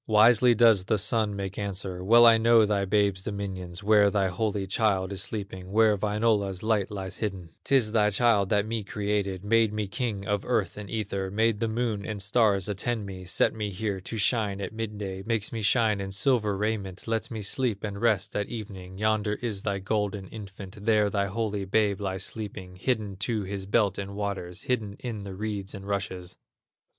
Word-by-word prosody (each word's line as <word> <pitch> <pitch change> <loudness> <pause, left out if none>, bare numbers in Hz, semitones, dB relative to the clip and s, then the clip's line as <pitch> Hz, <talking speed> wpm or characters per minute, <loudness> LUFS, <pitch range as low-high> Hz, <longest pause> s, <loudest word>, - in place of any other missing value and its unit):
Wisely 115 +3 +6
does 110 -4 +5
the 110 - +1
Sun 105 0 +1
make 100 0 -5
answer: 95 -2 -4
"Well 120 +4 +7
I 115 -1 +7
know 115 -1 +5
thy 100 -1 0
babe's 100 -1 +1
dominions, 95 -2 -5
Where 105 -1 +5
thy 100 -1 +1
holy 100 +1 -1
child 95 -2 +1
is 100 0 -2
sleeping, 95 -2 -5
Where 110 0 +4
Wainola's 105 -2 0
light 110 -3 +1
lies 95 -2 -6
hidden; 95 -6 -4
'Tis 130 -6 +3
thy 105 -2 +3
child 105 -2 +3
that 105 -1 +2
me 110 -1 -3
created, 100 -2 -2
Made 115 0 +3
me 105 -1 -2
king 105 -2 -3
of 105 -1 -1
earth 115 -6 0
and 105 -1 -8
ether, 100 -3 -3
Made 110 +1 +1
the 115 - 0
Moon 110 -2 -1
and 105 -1 -4
Stars 100 -1 +2
attend 105 +2 -2
me, 95 -2 -8
Set 90 - +1
me 105 -2 -3
here 100 0 -3
to 110 +5 -6
shine 105 -2 +1
at 100 - -5
midday, 105 -4 -5
Makes 110 -1 -1
me 115 - -4
shine 105 -1 +2
in 95 0 -5
silver 105 -1 +1
raiment, 100 -2 -3
Lets 115 -1 -1
me 110 -3 -5
sleep 110 -1 -1
and 100 -1 -4
rest 110 -4 +1
at 105 - -1
evening; 95 -5 -7
Yonder 110 0 +1
is 110 -5 -2
thy 100 0 -1
golden 100 0 -2
infant, 100 -1 -10
There 105 -2 +3
thy 100 0 0
holy 105 0 -2
babe 105 0 +1
lies 95 -1 -2
sleeping, 100 -4 -6
Hidden 105 -1 -2
to 105 +2 -1
his 95 0 -5
belt 100 -2 +2
in 100 0 -5
water, 100 -4 -3
Hidden 110 -5 -1
in 110 -5 -5
the 95 -1 -7
reeds 105 -1 -4
and 100 0 -9
rushes." 95 -3 -4
105 Hz, 190 wpm, -27 LUFS, 95-110 Hz, -, Well